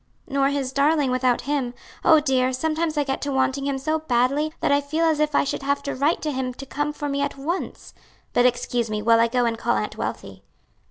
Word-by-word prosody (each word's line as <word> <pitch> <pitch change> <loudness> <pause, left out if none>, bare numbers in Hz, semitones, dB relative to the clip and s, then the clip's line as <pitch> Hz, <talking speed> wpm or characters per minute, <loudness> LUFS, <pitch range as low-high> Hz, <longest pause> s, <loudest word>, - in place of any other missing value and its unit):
"Nor 275 -1 +1
his 280 -2 -2
darling 285 -1 +2
without 255 -1 +1
him. 270 -3 -2 0.3
Oh, 315 - +6
dear! 260 -3 +1
sometimes 315 +3 -1
I 295 - +3
get 270 -1 -3
to 285 - -2
wanting 265 +1 0
him 275 -1 -1
so 310 +4 -1
badly 275 +2 +1
that - - +1
I 285 0 +4
feel 310 +4 -1
as 315 -2 +2
if 300 -1 +1
I - - +4
should - - -3
have 280 +1 -1
to 280 - -3
write 290 +5 0
to 305 - -1
him 260 -2 -3
to 275 - -8
come 290 +2 -2
for 295 0 -5
me 280 0 -1
at 280 0 -2
once. 330 +7 -4 0.4
But 245 +1 +5
excuse 240 -1 -1
me 210 -1 -3
while 230 +1 +5
I 230 - +4
go 245 +1 +1
and 230 -1 -1
call - - +1
Aunt - - -3
Wealthy." - - -5
280 Hz, 235 wpm, -23 LUFS, 255-295 Hz, 0.4 s, Oh